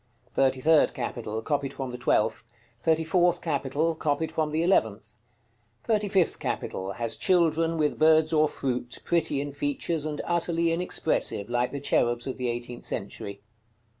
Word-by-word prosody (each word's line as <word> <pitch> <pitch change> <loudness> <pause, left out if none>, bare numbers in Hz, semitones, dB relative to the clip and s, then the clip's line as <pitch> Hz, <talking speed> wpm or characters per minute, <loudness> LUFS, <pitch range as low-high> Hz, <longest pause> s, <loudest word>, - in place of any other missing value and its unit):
THIRTY 130 -1 +1
THIRD 160 +1 +4
CAPITAL. 115 -3 -4
Copied 140 -1 -1
from 130 -2 -4
the 125 - -6
twelfth. 115 -1 +1 0.3
THIRTY 160 +3 +2
FOURTH 175 +1 +2
CAPITAL. 150 +1 0
Copied 155 0 -1
from 155 -1 0
the 155 +2 0
eleventh. 185 +3 +1 0.7
THIRTY 215 -2 +1
FIFTH 190 -4 +2
CAPITAL. 95 +1 -3
Has 115 +1 -3
children, 165 -2 +2
with 150 -2 0
birds 155 0 +5
or 155 -1 +4
fruit, 125 -3 -3
pretty 165 -4 +1
in 145 0 -4
features, 145 +2 -1
and 150 -1 -4
utterly 170 -1 +1
inexpressive, 165 - -1
like 120 0 +1
the 140 - -4
cherubs 120 -3 +1
of 130 - -4
the 125 -1 -2
eighteenth 120 0 -5
century. 100 0 -6
150 Hz, 155 wpm, -27 LUFS, 125-165 Hz, 0.7 s, birds